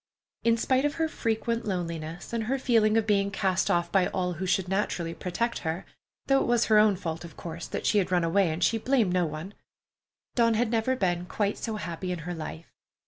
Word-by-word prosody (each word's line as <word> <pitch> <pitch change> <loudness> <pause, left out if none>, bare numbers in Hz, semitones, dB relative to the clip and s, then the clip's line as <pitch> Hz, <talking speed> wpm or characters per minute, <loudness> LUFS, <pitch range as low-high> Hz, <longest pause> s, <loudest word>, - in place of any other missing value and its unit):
In 230 0 +3
spite 260 +3 +2
of 290 0 0
her 325 -1 +1
frequent 230 -4 -1
loneliness, 170 -2 -4
and 230 -2 -1
her 265 +4 0
feeling 225 -4 +3
of 225 - +2
being 200 -2 +2
cast 190 -2 0
off 175 0 +1
by 190 -2 +3
all 180 -1 -1
who 185 +3 -4
should 185 0 +1
naturally 180 -3 -1
protect 230 +8 -2
her—though 180 +10 -2
it - - -1
was 240 -1 +3
her 215 -1 +5
own 210 -2 +5
fault, 165 -3 -4
of 170 -2 -11
course, 170 0 -6
that - - -4
she 210 - +4
had 185 -1 -1
run 175 -2 +3
away, 175 +2 +3
and 160 +3 -2
she 225 - +2
blamed 230 -6 +2
no 180 -2 +2
one—Dawn 200 +7 -4
had 230 0 +1
never 235 +3 +1
been 180 -5 0
quite 205 +1 -1
so 225 -2 -3
happy 175 -1 -4
in 170 -3 -5
her 180 - -3
life. 160 0 -7
195 Hz, 210 wpm, -28 LUFS, 175-225 Hz, -, her